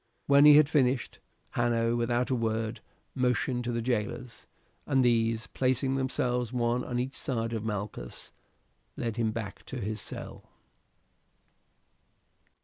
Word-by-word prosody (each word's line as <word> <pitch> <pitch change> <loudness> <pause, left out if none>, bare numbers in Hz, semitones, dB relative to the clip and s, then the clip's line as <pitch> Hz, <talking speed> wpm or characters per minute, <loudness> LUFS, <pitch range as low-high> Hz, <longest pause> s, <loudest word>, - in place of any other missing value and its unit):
When 140 +1 +6
he 150 -1 +10
had 150 -1 +6
finished, 130 -4 +1 0.3
Hanno 115 -1 +1
without 120 +2 0
a - - +3
word 110 -1 -1 0.3
motioned 125 -1 0
to 120 - -1
the 115 -1 -2
jailers, 120 0 -3 0.4
and 135 -2 +3
these, 115 -1 +2
placing 130 +1 0
themselves 125 -3 -1
one 120 0 0
on 120 - -3
each 130 +3 -2
side 115 -3 -2
of 110 -2 -3
Malchus, 105 - -5 0.6
led 115 -1 -3
him 115 -2 +1
back 110 -3 -6
to 130 - -5
his 110 -1 -3
cell. - - -8
120 Hz, 135 wpm, -29 LUFS, 115-130 Hz, 0.6 s, he